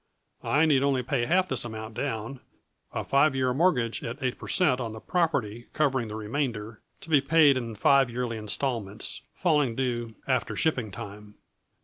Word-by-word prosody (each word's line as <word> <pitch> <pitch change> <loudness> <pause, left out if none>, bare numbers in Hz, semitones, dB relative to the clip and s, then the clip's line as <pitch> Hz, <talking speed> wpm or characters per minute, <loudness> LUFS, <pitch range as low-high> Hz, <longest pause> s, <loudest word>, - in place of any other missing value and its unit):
I 150 +3 +3
need 145 -4 +4
only 135 -2 +1
pay 120 -2 -1
half 185 +2 +3
this 130 - -1
amount 110 -1 -7
down, 115 +5 -4 0.5
a - - -3
five 140 0 +3
year 130 -1 +1
mortgage 130 -7 +1
at 115 +3 -4
eight 130 -3 -2
per - - -8
cent. 130 -9 +3
on 115 -2 -4
the 110 - -8
property 120 - -1
covering 135 -6 +1
the 105 - -6
remainder, 110 -1 -3 0.2
to - - -11
be 145 -3 +6
paid 150 0 +5
in 115 -3 -4
five 135 +4 +4
yearly 120 -1 -3
installments, 110 -1 -3
falling 150 -9 +2
due 120 -3 -2
after 130 -3 0
shipping 125 -9 0
time. 105 +2 -9
125 Hz, 170 wpm, -27 LUFS, 115-140 Hz, 0.5 s, be